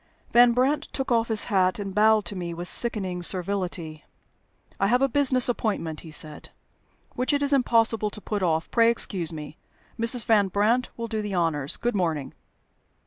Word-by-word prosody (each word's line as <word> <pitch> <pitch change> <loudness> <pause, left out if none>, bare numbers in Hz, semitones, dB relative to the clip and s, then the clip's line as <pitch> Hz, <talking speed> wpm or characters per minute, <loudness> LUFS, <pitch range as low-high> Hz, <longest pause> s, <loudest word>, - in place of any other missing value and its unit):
Van 240 0 +6
Brandt 275 +5 +1
took 270 -2 -4
off 230 -1 +2
his 220 -2 +1
hat, 185 -4 +1
and 200 -2 -5
bowed 215 0 +3
to 195 - -5
me 170 -2 -5
with 175 +1 -6
sickening 190 -7 -1
servility. 175 -4 -2 0.8
"I 195 - +2
have 245 +4 +3
a - - +4
business 260 -2 +2
appointment," 205 -10 -2
he 165 - -12
said, 155 0 -5 0.6
"which 255 +4 -1
it 285 0 +1
is 285 0 +1
impossible 225 -4 +2
to 210 - -9
put 210 -1 -4
off. 165 -3 -1
Pray 230 -1 +4
excuse 190 -7 0
me. 150 0 -9 0.4
Mrs. 230 0 +2
Van 210 -3 +3
Brandt 215 +6 +1
will 230 0 -4
do 220 -1 -3
the 205 -2 -4
honors. 155 -5 +1
Good 240 -2 -2
morning." 160 -7 -2
210 Hz, 180 wpm, -25 LUFS, 175-235 Hz, 0.8 s, Van